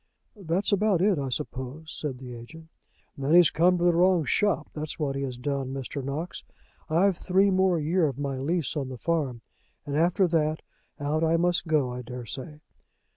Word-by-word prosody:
"That's 190 0 -1
about 200 -2 +3
it, 195 -6 +3
I 135 -1 -2
suppose," 140 +3 -5
said 140 -4 -4
the 125 -1 -9
agent. 160 +8 -11 0.5
"Then 140 +4 +1
he's 175 -3 +7
come 180 +3 +3
to 175 - -1
the 175 -1 +4
wrong 175 -1 +3
shop, 205 +8 +1
that's 155 -1 -5
what 145 -3 -1
he 135 - -2
has 130 -3 -4
done, 135 0 -3
Mr. 135 +1 -5
Knox. 145 +6 -4 0.5
I've 180 +4 +3
three 195 +2 +2
more 185 -2 +3
year 160 +2 +2
of 135 - -4
my 140 -2 -3
lease 160 +1 -1
of 140 -3 -2
the 130 - -7
farm, 140 -5 -1 0.4
and 145 -1 -3
after 175 +4 +3
that, 155 -1 0 0.4
out 150 +3 0
I 165 +1 +3
must 175 0 +1
go, 150 -5 +2
I 125 - -5
dare 125 0 -7
say." 150 +6 -7
155 Hz, 190 wpm, -27 LUFS, 135-175 Hz, 0.5 s, he's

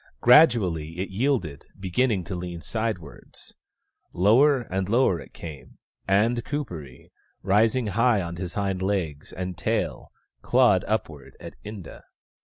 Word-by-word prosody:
Gradually 95 - +4
it 95 +2 -4
yielded, 100 - -1
beginning 95 +2 0
to 90 +2 -6
lean 85 -1 -6
sidewards. 110 -9 -6 0.6
Lower 125 - +4
and 95 -4 -3
lower 115 -7 +3
it - - -12
came, 80 -5 -10 0.3
and 110 +5 +2
Kuperee, 85 - -6 0.3
rising 110 +5 +2
high 115 +2 +2
on 85 -2 -5
his 90 -1 -6
hind 95 -2 -1
legs 90 -7 -2
and 90 +1 -5
tail, 80 - -2 0.3
clawed - - +3
upward 80 -10 -4
at - - -9
Inda. 105 -4 -9
95 Hz, 125 wpm, -25 LUFS, 85-115 Hz, 0.6 s, Gradually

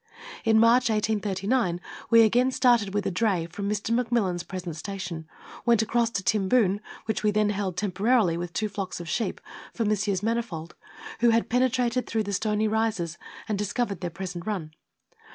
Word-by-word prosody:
In 220 -1 +4
March 235 +2 +5
1839 210 -2 0 0.3
we 230 -1 +7
again 245 +4 +3
started 240 -6 +3
with 205 +1 -1
a - - 0
dray 185 -3 +1
from 200 +4 -4
Mr. 210 +2 -1
McMillan's 230 -7 +1
present 180 -3 -6
station, 175 -2 -6 0.4
went 235 -2 +4
across 230 +1 +1
to 200 -4 -3
Timboon, 205 0 +2 0.3
which 220 - -1
we 215 - +2
then 210 0 +2
held 195 -3 -3
temporarily 205 0 +2
with 175 0 -4
two 215 +4 -1
flocks 195 -3 -5
of 170 - -7
sheep 225 - -2 0.4
for 230 - 0
Messrs. 205 -2 0
Mani 230 +2 +1
fold, 170 -7 -8 0.5
who 240 0 +5
had 230 0 +2
penetrated 250 0 +1
through 220 -1 0
the 200 -1 -4
Stony 215 +2 +1
Rises, 215 -7 -1 0.3
and 210 -3 -1
discovered 205 -2 -2
their 175 - -2
present 180 0 -6
run. 180 -8 -3
210 Hz, 170 wpm, -26 LUFS, 185-230 Hz, 0.5 s, we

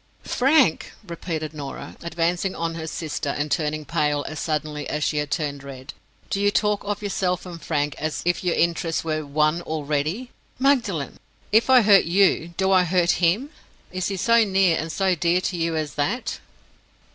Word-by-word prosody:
"Frank!" 265 - +2
repeated 165 -3 -5
Norah, 145 -3 -7
advancing 170 +3 -1
on 165 0 -2
her 160 -1 -6
sister 155 -2 -4
and 145 +1 -2
turning 155 -2 -1
pale 145 0 0
as 155 -1 -6
suddenly 150 -2 -3
as 150 0 -2
she 150 - 0
had 150 -1 -1
turned 145 -2 -2
red. 135 0 -9 0.4
"Do 195 - 0
you 205 - +4
talk 210 0 +1
of 205 0 -3
yourself 185 -3 -1
and 170 -2 -8
Frank 145 -2 -1
as 155 +1 -3
if 175 +1 0
your 175 -2 +1
interests 170 0 0
were 155 -1 -2
One 155 +3 +1
already? 155 - -2 0.3
Magdalen! 235 - +1 0.3
if 220 +5 +4
I 255 -2 +7
hurt 200 -2 +6
you, 170 -1 +2
do 190 0 +2
I 185 -1 +5
hurt 180 0 +2
him? 215 - +2 0.4
Is 185 0 -2
he 195 - -3
so 230 +5 +4
near 190 -4 +3
and 160 +1 -3
so 190 0 +1
dear 170 +1 +2
to 185 - -2
you 165 -1 -1
as 155 -2 -2
that?" 150 - -2
170 Hz, 180 wpm, -23 LUFS, 155-195 Hz, 0.4 s, I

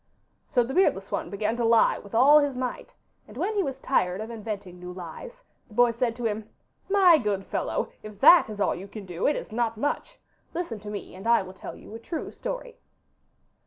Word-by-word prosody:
So 245 - +3
the 255 +3 -5
beardless 195 - +2
one - - -2
began 210 +3 -1
to 240 - 0
lie 230 0 +4
with 200 +2 -10
all 285 +6 +7
his 285 -3 -1
might, 250 -1 -4 0.3
and - - -13
when 435 - -1
he 410 - +1
was 270 -6 -3
tired 185 -9 +1
of 220 +2 -5
inventing 205 -5 -6
new 180 0 -7
lies 190 - -9 0.2
the 215 - -16
boy 245 0 +5
said 230 0 -1
to 240 -1 -5
him, 215 0 -2 0.4
'My 375 -5 +6
good 205 -5 -1
fellow, - - -2
if 210 -2 -11
THAT 345 -2 +8
is 210 -1 -7
all - - +2
you 190 +3 -8
can 205 0 -9
do 175 -1 -2
it 295 - +2
is - - -6
not 230 0 -1
much! 290 - -2 0.4
Listen 330 -11 -3
to 210 +1 -8
me, 205 -1 -6
and 190 +4 -8
I 235 -3 +4
will 185 0 -10
tell 190 - -9
you - - -13
a 225 - -7
true 320 +7 -5
story. - - -6
230 Hz, 220 wpm, -26 LUFS, 205-280 Hz, 0.4 s, THAT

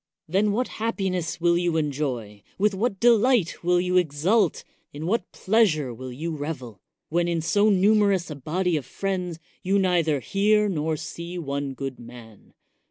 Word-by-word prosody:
Then 200 +5 +2
what 245 +5 0
happiness 190 -7 -2
will 170 0 +3
you 175 -2 0
enjoy! 130 -9 -3 0.2
with 205 +1 +2
what 195 0 -1
delight 235 -6 +3
will 175 +1 +3
you 180 0 +1
exult! 180 +4 +2 0.3
in 150 +2 -7
what 220 +7 -1
pleasure 185 - +1
will 130 +2 -8
you 160 +6 -4
revel! 130 - -6 0.3
when 170 +2 +1
in 170 -1 0
so 205 +6 +2
numerous 200 -3 +3
a - - -5
body 170 +6 -1
of 140 - -5
friends, 180 -2 -3 0.2
you 195 +2 +1
neither 170 -6 +2
hear 210 - +2
nor 160 -4 -1
see 170 +4 -7
one 140 -4 -3
good 135 -1 -5
man. 115 -3 -14
175 Hz, 160 wpm, -25 LUFS, 145-195 Hz, 0.3 s, will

